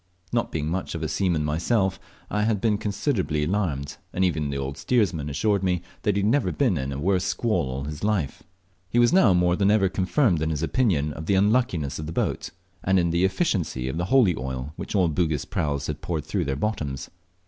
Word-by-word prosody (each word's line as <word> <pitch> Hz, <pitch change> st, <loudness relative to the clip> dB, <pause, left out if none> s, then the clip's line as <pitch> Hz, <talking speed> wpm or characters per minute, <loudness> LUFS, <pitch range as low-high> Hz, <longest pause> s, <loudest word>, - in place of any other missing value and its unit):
Not 115 Hz, -, 0 dB
being 75 Hz, -2 st, -2 dB
much 90 Hz, +2 st, -3 dB
of 80 Hz, -, -4 dB
a -, -, 0 dB
seaman 85 Hz, -3 st, 0 dB
myself 95 Hz, +6 st, +1 dB, 0.3 s
I 105 Hz, -, +1 dB
had 105 Hz, -1 st, +1 dB
been 105 Hz, -1 st, +1 dB
considerably 100 Hz, -, -1 dB
alarmed, 80 Hz, -6 st, -1 dB
and 95 Hz, -, +1 dB
even 80 Hz, -5 st, 0 dB
the 70 Hz, -, -2 dB
old 70 Hz, 0 st, -3 dB
steersman 90 Hz, -, +1 dB
assured 100 Hz, +7 st, +1 dB
me 90 Hz, -2 st, 0 dB, 0.2 s
he -, -, +1 dB
had 100 Hz, 0 st, 0 dB
never 130 Hz, +7 st, +2 dB
been 125 Hz, -9 st, +1 dB
in 70 Hz, -2 st, -2 dB
a 70 Hz, -, -4 dB
worse 90 Hz, +5 st, +1 dB
squall 100 Hz, -, 0 dB
all 65 Hz, +1 st, -4 dB
his 75 Hz, +3 st, -6 dB
life. 100 Hz, -9 st, 0 dB, 0.5 s
He 115 Hz, -, -1 dB
was 120 Hz, +3 st, +5 dB
now 120 Hz, -, +6 dB
more 90 Hz, 0 st, +3 dB
than 100 Hz, +1 st, +2 dB
ever 105 Hz, -3 st, +4 dB
confirmed 95 Hz, -, +1 dB
in 80 Hz, -, 0 dB
his 80 Hz, -1 st, -2 dB
opinion 80 Hz, -, +1 dB
of 80 Hz, +2 st, -7 dB
the 100 Hz, -, +3 dB
unluckiness 100 Hz, -, +1 dB
of 75 Hz, -, -5 dB
the 80 Hz, -, -5 dB
boat, -, -, -1 dB, 0.3 s
and 95 Hz, +1 st, +3 dB
in 85 Hz, -2 st, +2 dB
the 85 Hz, +2 st, +1 dB
efficiency 95 Hz, -, 0 dB
of 65 Hz, -, -3 dB
the 90 Hz, -, 0 dB
holy 105 Hz, -5 st, +4 dB
oil 65 Hz, +2 st, -5 dB
which -, -, -5 dB
all 95 Hz, -3 st, +4 dB
Bugis 80 Hz, -3 st, 0 dB
praus 70 Hz, -2 st, -2 dB
had 75 Hz, 0 st, -4 dB
poured 80 Hz, -4 st, -3 dB
through -, -, -1 dB
their 70 Hz, -1 st, -1 dB
bottoms. 70 Hz, -7 st, -3 dB
90 Hz, 215 wpm, -25 LUFS, 75-105 Hz, 0.5 s, now